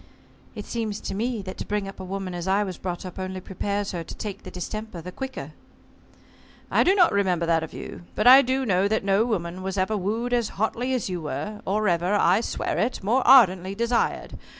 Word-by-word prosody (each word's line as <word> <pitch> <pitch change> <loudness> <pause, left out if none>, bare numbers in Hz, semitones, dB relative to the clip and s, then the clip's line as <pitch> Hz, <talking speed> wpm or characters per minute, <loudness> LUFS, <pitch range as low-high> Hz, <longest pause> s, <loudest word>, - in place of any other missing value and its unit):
"It 210 - -6
seems 220 -3 -3
to - - -4
me 225 +1 -2
that 185 0 -8
to - - -4
bring 205 -1 -1
up 195 - -9
a - - -6
woman 190 0 -4
as 175 +1 -5
I 195 +2 +3
was 185 -3 -6
brought 180 -1 -4
up 185 0 -8
only 185 0 -4
prepares 200 +2 -3
her 175 -3 -4
to - - -9
take 205 -2 -6
the - - -9
distemper 215 +1 -6
the 180 +2 -8
quicker." 260 - -6 1.2
"I - - +4
do 380 - +4
not 360 -4 +5
remember 185 -4 +1
that 165 -1 +2
of 160 - -6
you. 175 - -9
But 215 - 0
I 260 +2 +10
do 265 +1 0
know 195 -2 +2
that 220 0 0
no 200 +3 +3
woman 185 -5 -3
was 190 +1 -4
ever 190 +3 +1
wooed 220 +5 -2
as 235 -3 +1
hotly 240 +5 0
as 250 - -2
you 180 -3 -3
were 210 +7 -5
or 210 +2 +1
ever 175 +3 +1
I 195 +1 +4
swear - - -2
it 225 -2 -1
more 235 +7 +2
ardently 195 -7 +6
desired. 235 +2 -1
200 Hz, 220 wpm, -25 LUFS, 185-225 Hz, 1.2 s, I